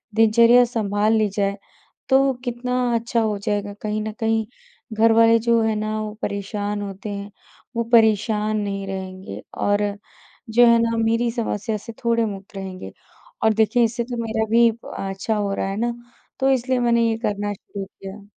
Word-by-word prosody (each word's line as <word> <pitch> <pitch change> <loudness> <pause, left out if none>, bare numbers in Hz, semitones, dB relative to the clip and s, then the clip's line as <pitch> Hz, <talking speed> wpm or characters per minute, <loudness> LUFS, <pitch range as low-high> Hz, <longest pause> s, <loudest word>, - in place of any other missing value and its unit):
दिनचर्या 230 +2 +6
सँभाल 215 -2 0
ली 215 - +2
जाए, 200 -1 0 0.5
तो 270 0 +4
कितना 245 +1 -3 0.2
अच्छा 230 0 0
हो 215 -2 0
जाएगा। 205 -1 -2
कहीं 215 0 -2
न 215 - -4
कहीं 225 -1 +1 0.5
घरवाले 225 +1 +5
जो 230 0 +2
हैं 220 -1 +1
ना, 215 0 -2
वो 215 -1 -5
परेशान 205 +1 -3
होते 195 +1 -6
हैं। 200 0 -6 0.4
वो 235 - +1
परेशान 215 -1 +3
नहीं 200 -1 -3
रहेंगे 190 0 -6 0.2
और 205 0 +1 0.7
जो 240 +2 +6
है 235 - +6
ना, 230 0 0
मेरी 230 +1 +1
समस्या 225 -2 -2
से 225 +2 -10
थोड़े 230 -1 +2
मुक्त 200 -1 -7
रहेंगे 190 -1 -7 0.5
और 220 - +4
देखिए, 220 +3 +3
इससे 235 +1 0
तो 240 0 -6
मेरा 220 0 -1
भी 235 0 +6 0.3
अच्छा 195 +3 -2
हो 205 -1 -1
रहा 195 - -2
है 195 - -4
ना, 235 +2 0 0.5
तो 270 0 +2
इसलिए 255 0 +1
मैंने 235 -1 +3
ये 225 - -1
करना 205 -2 -2
शुरू 200 0 -8
किया। 195 +1 -11
220 Hz, 170 wpm, -22 LUFS, 205-230 Hz, 0.7 s, दिनचर्या